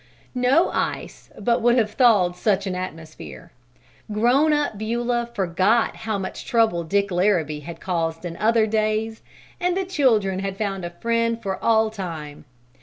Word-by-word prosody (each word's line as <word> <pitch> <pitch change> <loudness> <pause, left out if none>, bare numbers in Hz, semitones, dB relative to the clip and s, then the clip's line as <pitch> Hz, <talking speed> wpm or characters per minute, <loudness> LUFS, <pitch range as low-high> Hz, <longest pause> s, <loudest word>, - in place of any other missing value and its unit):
No 260 +7 +3
ice - - -4
but 235 +3 +1
would 240 +1 +3
have 215 -3 +1
thawed 215 -7 +4
in 180 - -16
such 200 -2 +1
an 190 - -2
atmosphere! 160 - -8 0.6
Grown 245 +8 +3
up 295 -6 0
Beulah 235 +2 -2
forgot 190 +5 +1
how 220 -1 -3
much 190 -1 -6
trouble 225 -8 +1
Dick 200 +4 0
Larrabee 175 -5 +1
had 165 +3 -9
caused 165 -2 -2
in 170 -1 -5
other 225 0 +3
days, 220 +1 -1 0.4
and 360 0 0
the 385 - -1
children 225 - +1
had 195 0 -4
found 195 -3 -3
a 175 - -3
friend 230 +5 -1
for 195 -4 -5
all 220 -1 +3
time. 160 -8 -7
210 Hz, 160 wpm, -23 LUFS, 180-230 Hz, 0.6 s, thawed